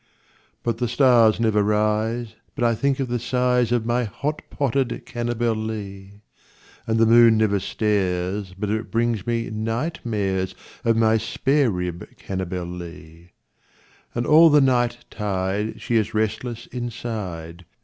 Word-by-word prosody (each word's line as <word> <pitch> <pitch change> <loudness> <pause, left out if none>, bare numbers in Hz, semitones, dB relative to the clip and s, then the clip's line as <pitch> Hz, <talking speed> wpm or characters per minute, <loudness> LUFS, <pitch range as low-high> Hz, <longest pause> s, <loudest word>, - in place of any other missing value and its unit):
But 115 -1 -1
the 120 - 0
stars 120 -3 +4
never 110 -2 +2
rise 110 +2 0 0.2
but - - -2
I 120 -1 +3
think 140 +4 0
of 135 - -1
the 120 0 -1
size 125 -1 +1
Of 120 -2 +1
my 120 +1 +1
hot 145 +8 -3
potted 130 -3 -1
Cannibalee, 110 -5 -3 0.7
And 110 0 +1
the 115 - +5
moon 115 0 +6
never 105 -2 +2
stares 95 -2 -1
but 105 +1 -2
it 110 +1 -2
brings 115 -3 0
me 115 -1 -1
night 115 +9 -2
mares 95 -5 -1 0.3
Of 115 -2 +2
my 110 0 +4
spare 135 +5 +1
rib 90 -3 -5
Cannibalee; 90 -2 -6 0.9
And 120 0 -1
all 160 +4 +7
the 150 -1 +6
night 120 -3 +1
tide 100 +1 -2
she 120 - 0
is 110 0 -1
restless 110 +2 -2
inside. 100 -9 -6
110 Hz, 140 wpm, -23 LUFS, 100-120 Hz, 0.9 s, all